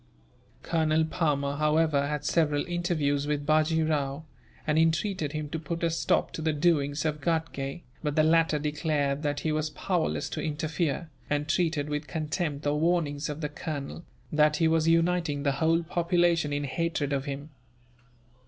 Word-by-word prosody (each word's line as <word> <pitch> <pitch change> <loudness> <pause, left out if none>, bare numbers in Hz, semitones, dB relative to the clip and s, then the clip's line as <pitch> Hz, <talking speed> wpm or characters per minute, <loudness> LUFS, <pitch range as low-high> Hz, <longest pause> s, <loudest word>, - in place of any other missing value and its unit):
Colonel 160 -1 +2
Palmer, 145 -3 0
however, 150 -1 +2
had 150 0 -3
several 150 -2 +2
interviews 155 -5 0
with 145 -1 -1
Bajee 155 +1 +3
Rao, 145 -1 -1 0.4
and 155 0 +2
entreated 165 -1 +1
him 155 -1 -3
to 160 - -3
put 165 +2 -4
a 165 - +2
stop 165 - +1
to - - -5
the 155 0 +1
doings 145 -2 +1
of 150 -1 -1
Ghatgay; 160 -2 -2 0.2
but 150 -2 -2
the 155 - +4
latter 165 -1 +3
declared 150 -1 -1
that 145 -1 -1
he 155 - 0
was 155 0 0
powerless 175 +2 -1
to - - -4
interfere, 155 +1 -2 0.2
and 145 0 0
treated 160 -3 +1
with 150 0 -3
contempt 155 -2 -2
the 145 - +1
warnings, 155 -2 0
of 150 +2 -5
the 150 - -2
colonel, 150 +1 -5 0.3
that 150 -1 +4
he 165 - +3
was 160 0 +2
uniting 165 -3 +2
the 140 - +2
whole 165 +1 +3
population 170 -2 +1
in 145 0 -1
hatred 145 0 -1
of 135 -1 -1
him. 140 +2 -6
155 Hz, 165 wpm, -28 LUFS, 145-165 Hz, 0.4 s, the